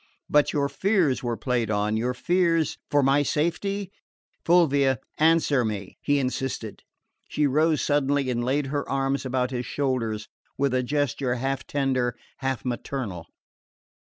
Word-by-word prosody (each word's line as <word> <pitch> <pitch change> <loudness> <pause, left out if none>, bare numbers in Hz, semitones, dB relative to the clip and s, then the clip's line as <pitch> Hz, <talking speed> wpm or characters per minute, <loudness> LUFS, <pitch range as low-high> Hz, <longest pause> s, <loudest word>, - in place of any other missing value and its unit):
"But 150 0 +3
your 140 -1 +1
fears 170 -1 +1
were 120 -2 -2
played 120 -4 -1
on 105 0 0
your 125 +3 -1
fears 170 +1 +1
for 145 -1 +3
my 135 +2 +4
safety? 190 +7 -1 0.5
Fulvia, 140 -7 +4 0.2
answer 155 -4 +4
me!" 105 -4 -5
he 145 0 +2
insisted. 130 -4 -3 0.5
She 150 - +1
rose 155 +2 +2
suddenly 145 -2 +1
and 120 -1 -1
laid 135 +3 0
her 145 -1 -2
arms 135 0 0
about 125 0 0
his 125 -2 -3
shoulders, 120 -6 -1 0.3
with 140 -1 +1
a 130 - +2
gesture 135 -1 -1
half 135 +2 -2
tender, 130 -4 0 0.2
half 135 -2 -3
maternal. 120 -8 -4
135 Hz, 140 wpm, -25 LUFS, 125-145 Hz, 0.5 s, my